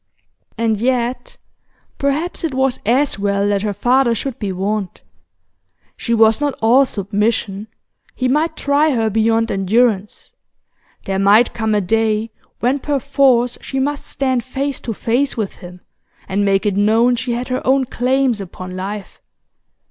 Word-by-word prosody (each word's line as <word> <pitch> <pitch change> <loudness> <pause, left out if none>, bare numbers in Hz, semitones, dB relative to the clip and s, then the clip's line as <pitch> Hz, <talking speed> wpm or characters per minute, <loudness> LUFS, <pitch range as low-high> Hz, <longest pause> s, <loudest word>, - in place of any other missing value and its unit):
And 225 -1 +1
yet, 255 - -1 0.6
perhaps 295 +7 -1
it 310 -5 -2
was 265 -1 +1
as 255 0 +2
well 200 0 0
that 200 -1 +1
her 210 0 -1
father 240 +4 +2
should 265 +2 -5
be 205 -3 -2
warned. 195 +1 -3 0.9
She 235 - -5
was 225 +2 +4
not 290 -1 0
all 250 +5 +4
submission, 205 0 -2 0.5
he 255 - -1
might 300 +6 0
try 285 0 +2
her 225 -2 0
beyond 225 +1 +1
endurance; 205 +1 0 0.7
there 195 0 -1
might 205 +4 +4
come 220 -2 0
a 205 - +2
day 220 +2 0 0.3
when 255 +4 +1
perforce 270 -4 +1
she 270 - -5
must 285 +2 -2
stand 260 -3 -1
face 270 +2 -3
to 230 - -4
face 250 +6 0
with 210 -4 -3
him, 180 0 -12 0.5
and 200 +2 0
make 195 +1 +1
it 205 -2 +1
known 225 +4 +3
she 240 +1 -3
had 245 +2 -4
her 255 - -1
own 265 0 +2
claims 250 -2 0
upon 185 0 -8
life. 195 +2 -6
230 Hz, 150 wpm, -18 LUFS, 205-265 Hz, 0.9 s, was